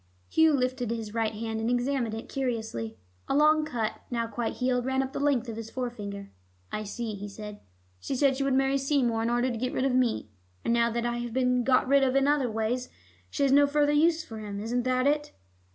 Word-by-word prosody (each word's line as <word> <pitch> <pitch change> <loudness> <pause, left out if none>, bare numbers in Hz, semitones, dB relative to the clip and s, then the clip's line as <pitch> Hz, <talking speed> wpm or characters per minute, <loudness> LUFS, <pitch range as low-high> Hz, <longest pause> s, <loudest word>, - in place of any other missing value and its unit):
Hugh 320 -1 +4
lifted 255 -3 0
his 225 -2 -4
right 225 -1 0
hand, 220 0 -3
and 225 - 0
examined 245 -2 0
it 225 - -7
cursorily. 225 - -3 0.3
A - - 0
long 305 +1 +5
cut, 230 -6 -3
now 235 -2 -1
quite 230 0 -3
healed, 250 -1 0
ran 265 0 +1
up 265 +1 -6
the - - -3
length 275 -4 +1
of 225 -1 -5
his 225 -1 -6
forefinger. 205 -6 -5 0.4
"I 215 0 -3
see," 225 +1 -4
he 205 0 -6
said. 210 +1 -8 0.4
"She 265 - -3
said 270 0 +3
she 275 - -1
would 275 -1 +1
marry 270 +1 +2
Seymour 265 -5 +1
in 230 - 0
order 240 +2 +1
to 235 - -3
get 250 +2 -2
rid 260 - 0
of 270 - +1
me, 245 - +1 0.3
and - - +2
now 235 0 +3
that 235 +1 -2
I 240 0 -1
have 240 -1 -5
been 250 -1 +2
got 255 0 +3
rid 280 +1 +5
of 265 -1 +2
in 275 0 +3
other 285 -4 +2
ways, 225 +3 -2 0.4
she - - -1
has 275 - +3
no 285 +1 +6
further 295 0 +2
use 320 +2 +3
for 225 -5 -8
him. 205 -2 -5
Isn't 240 +3 -1
that 255 0 +1
it?" 295 +1 +1
245 Hz, 230 wpm, -28 LUFS, 225-270 Hz, 0.4 s, no